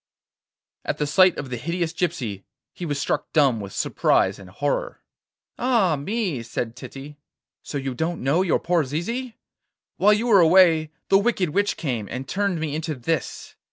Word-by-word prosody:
At - - -2
the 150 - 0
sight 185 +5 +4
of 135 -3 -6
the 125 - -2
hideous 170 +5 -2
gypsy 130 - -3 0.3
he 175 - -6
was 145 -2 -2
struck - - -2
dumb 140 -7 +3
with 100 -2 -7
surprise - - +1
and 95 -2 -12
horror. 145 +9 -3 0.6
'Ah 230 -10 +2
me!' 180 - -2
said 115 0 -4
Titty, 135 +3 -10 0.4
'so 145 - -5
you 135 -1 -3
don't 160 +4 -3
know 140 +7 +2
your 185 -4 +2
poor 175 -2 +1
Zizi? 225 - -4 0.6
While 210 +2 +5
you 215 +3 0
were 215 -5 +6
away 165 -2 +5 0.2
the 195 - +6
wicked 200 -6 0
witch 205 +5 0
came, 120 -9 -3
and 130 +1 -5
turned 195 +1 -1
me 155 -2 -3
into 155 0 -3
this. 140 +4 -3
160 Hz, 170 wpm, -23 LUFS, 135-185 Hz, 0.6 s, were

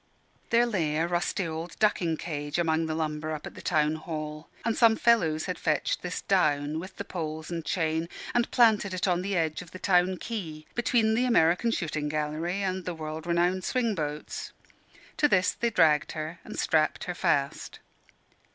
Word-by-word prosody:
There 235 +1 +4
lay 165 -10 0
a 165 - +2
rusty 175 +2 -1
old 165 +1 -5
ducking 175 -6 +2
cage 145 -2 -4
among 165 -1 +1
the 155 - -2
lumber 155 0 -2
up 155 - -6
at - - -8
the - - -10
town 155 0 +1
hall; 155 -1 -6 0.2
and 230 -1 +1
some 230 -2 +5
fellows 170 -11 +3
had 180 - -4
fetched 155 -4 0
this 180 0 -4
down, 150 -5 +1
with 185 +2 -9
the 200 - -5
poles 160 -2 -5
and 165 -1 -3
chain, 160 0 -1 0.2
and 240 0 +2
planted 215 -5 +4
it 185 - -1
on 180 -1 +2
the 195 +1 -2
edge 160 -1 0
of 180 - -11
the 185 - -9
Town 185 0 +2
Quay, 165 -10 -6
between 230 -2 +2
the 245 +3 +2
American 185 -2 +3
Shooting 155 -8 -2
Gallery 155 +5 -2
and 185 -1 -2
the 175 0 -4
World 155 +1 -6
Renowned 175 +2 +1
Swing 240 -4 0
Boats. 150 -4 -4 0.6
To 295 - +4
this 185 -8 +3
they 235 - -1
dragged 155 -8 +3
her, 155 +2 -5
and - - -8
strapped 155 +2 +1
her 180 -4 -3
fast. 145 -6 -1
170 Hz, 185 wpm, -28 LUFS, 155-195 Hz, 0.6 s, some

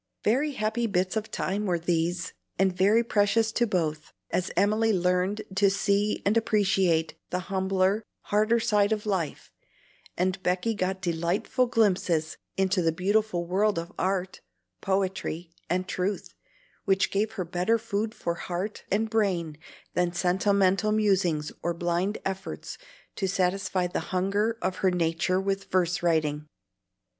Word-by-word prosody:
Very 275 +7 +2
happy 225 0 -1
bits 185 -1 0
of 220 0 -2
time 200 +2 -2
were 175 -2 +2
these, 170 0 -1 0.2
and 190 -1 +2
very 205 +5 +4
precious 220 0 +2
to 240 +1 +1
both, 155 -6 -2 0.2
as 185 - 0
Emily 215 +2 +3
learned 180 +2 +1
to 200 0 +4
see 200 +1 +1
and 200 +2 +3
appreciate 195 -7 +2 0.2
the 180 - -1 0.2
humbler, 190 +2 +2 0.2
harder 215 +3 +2
side 210 -2 +2
of 215 -1 -1
life, 185 -7 -2 0.7
and 185 +1 0
Becky 185 +6 0
got 190 -1 -2
delightful 175 +9 0
glimpses 180 -8 +1 0.2
into 190 -1 +2
the 165 -1 +2
beautiful 190 +1 0
world 200 +3 +1
of 170 +1 -4
art, 190 0 -1 0.4
poetry, 190 -3 -2 0.2
and 185 +1 0
truth, 190 +2 -2 0.5
which 195 0 +2
gave 210 +2 0
her 185 -4 -3
better 180 +6 +1
food 215 0 -3
for 170 - -2
heart 180 +4 -4
and 215 +3 +1
brain 190 -8 0 0.4
than 175 -1 +1
sentimental 195 +3 +2
musings 190 -8 +1
or 170 0 -1
blind 175 +4 0
efforts 195 0 -5 0.4
to 195 - 0
satisfy 185 0 0
the 180 - -2
hunger 200 +5 0
of 185 - -1
her 190 - +2
nature 175 +1 +1
with 195 0 -1
verse 180 -1 +1
writing. 155 -3 0
190 Hz, 140 wpm, -27 LUFS, 180-210 Hz, 0.7 s, very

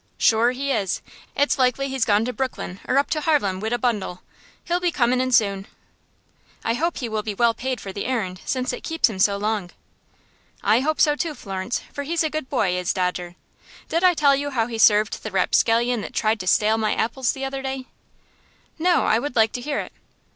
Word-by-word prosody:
"Shure 230 +2 +4
he 275 +3 -2
is. 200 -7 0 0.4
It's 285 0 +1
likely 255 +2 +2
he's 265 -3 0
gone 210 +1 +3
to 250 - -3
Brooklyn 255 -8 -4
or 265 - +2
up 280 - +1
to 305 - 0
Harlem, 280 - +1
wid 220 +3 -3
a 240 - +1
bundle. 215 -7 -2 0.4
He'll 350 +1 0
be 360 -1 +1
comin' 250 -3 +2
in 255 0 -1
soon." 200 -5 +2 1.0
"I 230 - +2
hope 330 +8 -1
he 245 - -3
will 215 -1 -2
be 210 -1 -4
well 235 +2 +3
paid 255 0 -3
for 195 - -7
the 200 - -4
errand, 190 -8 -2
since 255 -1 -2
it - - -6
keeps 325 -7 +1
him 190 - -7
so 200 +1 +3
long." 210 -3 -2 0.9
"I 215 +3 +4
hope 310 +4 -1
so, 295 -1 +4
too, 320 -1 -3
Florence, 195 0 -4
for 285 - -4
he's 330 +4 0
a 310 - -1
good 310 -4 -4
boy, 195 -9 +1
is 180 -1 -1
Dodger. 180 -1 -2 0.5
Did 335 +2 0
I 365 -1 +5
tell 285 -2 +4
you 285 +1 -2
how 235 -5 0
he 230 -1 -5
served 210 -1 +4
the 220 - -5
rapscallion 230 +4 +2
that - - -8
tried 215 0 +1
to 185 - -6
stale 215 +4 +3
my 215 -1 0
apples 240 +3 0
the 270 0 -4
other 270 0 -4
day?" 265 -1 -4 0.9
"No; 350 +1 +3
I 220 - +3
would 285 +1 -4
like 220 -1 +4
to 245 - -5
hear 290 +3 -2
it." - - -10
240 Hz, 220 wpm, -23 LUFS, 210-275 Hz, 1.0 s, I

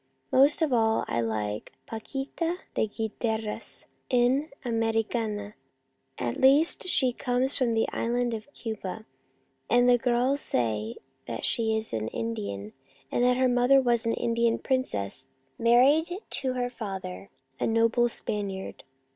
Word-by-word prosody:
Most 285 +5 +5
of 295 -5 +1
all 225 -2 +2
I 115 - 0
like 105 -2 -3
Paquita 275 +9 -4 0.2
de - - +1
Guiteras, 220 0 -3 0.2
an 255 +4 +2 0.2
Americana, 225 -2 -1 0.6
at 120 - -2
least 285 +7 +5
she 260 -8 +4
comes 250 +2 0
from 240 -4 +1
the 225 - +2
Island 240 0 0
of 225 +5 -7
Cuba, 220 -4 -6 0.6
and 245 +1 +4
the 245 -1 +5
girls 250 +4 +1
say 110 -2 -1 0.3
that 115 -1 -3
she 220 -1 +2
is 220 0 -3
an 110 -1 -2
Indian, 200 - -4 0.4
and 245 - +1
that 250 0 +3
her 260 0 +3
mother 245 +2 +4
was 240 -3 +2
an 230 - +2
Indian 230 0 +1
princess 130 - -1 0.3
married 260 +8 +5 0.2
to 260 -2 +1
her 245 -1 -2
father, 190 - -6 0.3
a - - 0
noble 230 +1 +3
Spaniard. 200 -4 -4
230 Hz, 135 wpm, -27 LUFS, 210-250 Hz, 0.6 s, Most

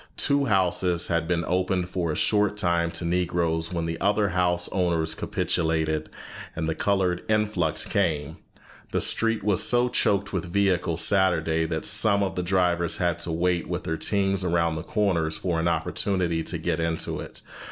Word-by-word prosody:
Two 140 -1 +1
houses 90 -4 +2
had 85 -1 0
been 85 -1 0
opened 90 0 0
for 85 -3 -2
a - - -3
short 105 +2 +1
time 85 -4 +1
to 85 - -4
Negroes 85 -1 0
when 85 -2 -2
the 80 -1 -4
other 105 0 +2
house 90 -1 0
owners 85 -4 0
capitulated, 80 -1 -1 0.5
and 80 -1 -2
the 80 - 0
colored 95 -1 0
influx 105 -7 0
came: 80 -6 -1 0.6
"The - - +2
street 115 -2 +1
was 100 -3 +2
so 125 0 +3
choked 100 -4 0
with 90 -3 -2
vehicles 90 -4 +1
Saturday 85 -4 +2
that 80 -1 -3
some 100 -2 +3
of 95 -3 -2
the 90 - -1
drivers 90 -1 +1
had 85 -2 0
to 85 - -2
wait 85 +1 0
with - - -3
their 80 - -2
teams 95 +1 0
around 85 -2 +1
the 80 - -4
corners 85 -5 0
for 85 -3 -1
an 80 - 0
opportunity 85 +1 0
to - - -3
get 80 - -2
into 80 0 -2
it. - - -9
90 Hz, 175 wpm, -25 LUFS, 80-95 Hz, 0.6 s, so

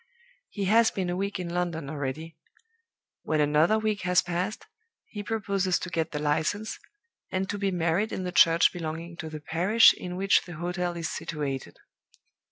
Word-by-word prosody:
He 200 -2 -3
has 225 +3 +5
been 185 -2 -3
a - - -1
week 200 +1 -2
in 180 - -4
London 170 -4 -2
already. 150 +3 -5 0.9
When 155 -1 -1
another 150 +8 +3
week 215 -1 -1
has 180 0 +3
passed, 180 +4 -3 0.4
he 205 - -7
proposes 200 -4 0
to 185 - -6
get 160 -2 -1
the 150 - -3
License, 155 +8 -1 0.5
and 190 0 -1
to 205 - -4
be 200 0 +1
married 175 +4 0
in 185 - -3
the 180 - -3
church 165 -1 +5
belonging 165 0 -5
to 160 -2 -6
the 155 0 -7
parish 180 +9 +5
in 180 0 -7
which 195 +2 +3
the 175 - -9
hotel 175 +1 -3
is 165 -1 -2
situated. 145 -4 -4
175 Hz, 175 wpm, -27 LUFS, 160-195 Hz, 0.9 s, has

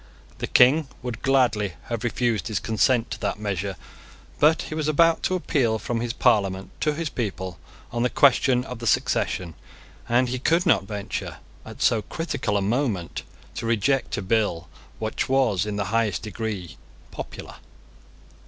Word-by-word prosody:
The - - -2
King 135 +5 +5 0.2
would 120 -2 -5
gladly 115 -8 +2
have 115 -2 -4
refused 115 -5 0
his 110 -4 -1
consent 115 +2 +1
to - - -4
that 100 -2 -2
measure: 100 -2 -3 0.6
but 155 +2 +4
he - - -7
was 155 -1 -2
about 165 +2 +4
to 185 - 0
appeal 130 -10 +1
from 115 +2 -3
his 120 -1 -1
Parliament 100 -6 +1
to 150 -1 +1
his 165 +1 -2
people 95 - -4 0.3
on 120 0 -2
the 125 - +2
question 130 -2 +4
of 125 -2 -7
the 115 - -4
succession, 90 -4 +1 0.6
and 125 +1 +3
he 125 0 -2
could 165 +7 +2
not 110 - +3
venture, 105 -1 -5 0.3
at - - -6
so 115 - +3
critical 120 -8 -2
a 100 - 0
moment, 105 -5 -1 0.3
to 115 - -4
reject 120 +3 +1
a 100 - -3
bill 95 -5 0 0.3
which 110 +5 -2
was 115 -8 +2
in 105 - -3
the 100 -1 -1
highest 110 -6 +1
degree 105 -5 -5 0.3
popular. - - -8
115 Hz, 160 wpm, -24 LUFS, 100-130 Hz, 0.6 s, King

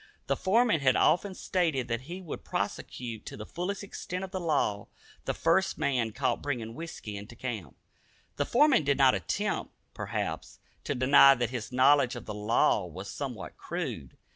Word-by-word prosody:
The - - +1
foreman 215 -1 +3
had 130 -2 +3
often 190 +2 +2
stated 160 -12 0
that 115 0 -2
he 180 +2 -6
would 165 - -7
prosecute 115 -3 -4
to - - -7
the 105 - -7
fullest 190 - -4
extent 185 -2 -5
of 190 - -6
the 190 - -3
law 145 - 0 0.4
the - - 0
first 170 +4 +2
man 130 -7 0
caught - - -1
bringing 120 -6 -3
whisky 155 -8 -7
into 105 +4 -9
camp. 110 - -5 0.6
The 145 - +1
foreman 270 - +4
did 140 -1 +2
not 135 -2 +6
attempt, 95 -5 -2 0.2
perhaps, - - -4 0.3
to 145 - -1
deny 135 +2 +7
that 120 -1 -1
his 120 -2 -5
knowledge 130 0 +4
of 120 - -8
the 105 - -5
law 105 +2 +2
was - - -8
somewhat - - -6
crude. 65 -3 -5
135 Hz, 170 wpm, -29 LUFS, 115-170 Hz, 0.6 s, deny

